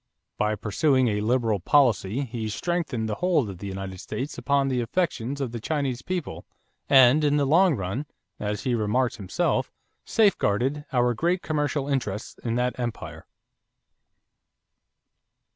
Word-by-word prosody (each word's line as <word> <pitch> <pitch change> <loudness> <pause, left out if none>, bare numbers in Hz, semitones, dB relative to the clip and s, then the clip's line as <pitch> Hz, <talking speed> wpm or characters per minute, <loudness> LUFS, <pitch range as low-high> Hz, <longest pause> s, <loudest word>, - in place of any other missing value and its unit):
By 105 0 +1
pursuing 125 +5 +2
a 105 -1 -1
liberal 115 -2 +1
policy, 120 - +2
he 115 -4 -4
strengthened 145 - -2
the 110 - -2
hold 160 - +2
of 90 - -11
the 100 - -6
United 95 -1 -6
States 135 +10 -5
upon 140 +3 +1
the 130 -2 0
affections 135 -1 -2
of 135 -4 -2
the 120 - -5
Chinese 135 -1 -2
people 160 - -4 0.5
and, 135 +2 +6
in 145 0 +3
the 145 - +2
long 170 +3 +4
run, 105 +9 -4 0.3
as 105 0 -3
he 125 - 0
remarked 120 +3 0
himself, 95 -5 -1 0.3
safeguarded 145 - +1
"our 125 -2 +2
great 175 +9 0
commercial 145 -2 -1
interests 115 -7 -3
in 115 -1 -1
that 125 +1 -1
Empire." 120 -3 -5
125 Hz, 145 wpm, -25 LUFS, 110-145 Hz, 0.5 s, and